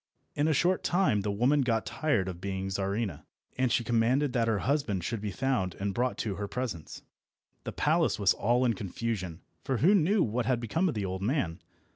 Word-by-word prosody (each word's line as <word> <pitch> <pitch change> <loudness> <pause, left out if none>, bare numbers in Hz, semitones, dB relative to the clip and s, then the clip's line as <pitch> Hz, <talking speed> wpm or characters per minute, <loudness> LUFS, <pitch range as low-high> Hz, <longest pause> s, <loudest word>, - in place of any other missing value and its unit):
In 145 +1 +1
a - - +3
short 180 +5 +2
time 175 - +2
the 105 - -2
woman 125 +8 +2
got 115 -4 0
tired 130 -12 0
of 90 -2 -6
being 95 0 -3
Czarina, 95 -4 -2 0.3
and 130 -1 +1
she 120 - +2
commanded 125 +4 +2
that 115 -2 +1
her 110 -2 +2
husband 130 - 0
should 110 +3 -3
be 105 - -3
found 105 -3 -1
and 100 0 -3
brought 125 +3 0
to 100 -3 -3
her 100 0 -3
presence. 105 - -5 0.6
The - - -3
palace - - +1
was - - +3
all 120 +4 +1
in 120 - +3
confusion, 95 -3 -4 0.2
for 135 -3 -1
who 175 - +5
knew 200 +1 +3
what 115 +1 -1
had 125 -3 +2
become 160 - 0
of 150 - -3
the 105 -2 -2
old 95 0 -4
man? 100 - -1
115 Hz, 205 wpm, -29 LUFS, 100-130 Hz, 0.6 s, who